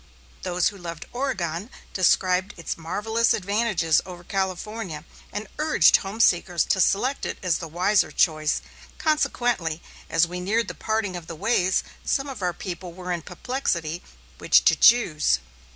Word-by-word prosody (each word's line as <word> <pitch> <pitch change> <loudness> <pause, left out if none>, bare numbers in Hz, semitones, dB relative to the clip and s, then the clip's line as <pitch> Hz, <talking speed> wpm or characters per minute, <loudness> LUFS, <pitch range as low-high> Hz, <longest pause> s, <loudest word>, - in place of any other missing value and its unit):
Those 180 0 +1
who 200 - -12
loved 170 -3 -7
Oregon 210 - -2 0.2
described 185 +1 +2
its 170 - -4
marvellous 220 +8 0
advantages 200 -5 +1
over 180 -1 -10
California, 190 -2 -4 0.3
and 210 - -5
urged 305 - +5
home 195 +3 -7
seekers 175 -5 +3
to 190 - +1
select 255 +10 +1
it - - -3
as 180 -4 +1
the 165 - -6
wiser 180 +6 +2
choice; 155 -3 +1 0.3
consequently, 240 - 0 0.3
as 165 +1 +3
we 180 +1 -6
neared 210 +4 0
the - - -5
parting 220 -4 -2
of 170 -2 -7
the 165 - -6
ways, 190 0 +1 0.2
some 275 0 0
of 265 -6 -7
our 180 -1 +1
people 175 0 -7
were 180 0 -6
in 175 -1 -2
perplexity 175 - -3 0.4
which - - +4
to - - +6
choose. 165 - +4
185 Hz, 150 wpm, -24 LUFS, 170-220 Hz, 0.4 s, to